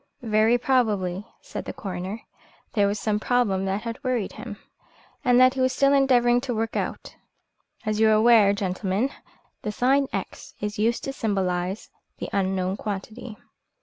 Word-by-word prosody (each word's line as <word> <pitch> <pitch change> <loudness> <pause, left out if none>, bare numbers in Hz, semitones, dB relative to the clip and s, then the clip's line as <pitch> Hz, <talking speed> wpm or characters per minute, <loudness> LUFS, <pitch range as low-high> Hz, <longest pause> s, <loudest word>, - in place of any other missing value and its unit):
"Very 220 +1 +3
probably," 210 -7 0
said - - -7
the - - -5
coroner, 190 +2 -6 0.5
"there 205 -3 +3
was 205 +2 -1
some 210 -1 0
problem 210 -5 +1
that 195 +3 -2
had 230 -1 -6
worried 250 -6 -1
him, 220 -5 -8 0.7
and 245 -2 +4
that 255 0 +6
he 265 - -2
was 255 0 +2
still 275 0 +3
endeavouring 245 -3 +4
to 250 -2 -3
work 225 +1 -2
out. - - -4 0.7
As 215 0 -1
you 220 0 +5
are - - +5
aware, 215 -2 +6
gentlemen, 200 +4 -1 0.5
the 210 - -3
sign 270 +5 +2
X - - -6
is 210 0 -4
used 230 +2 +1
to 270 - -4
symbolise 190 -4 -2 0.3
the - - -5
unknown 190 -1 0
quantity." 215 +2 -6
215 Hz, 160 wpm, -25 LUFS, 200-245 Hz, 0.7 s, that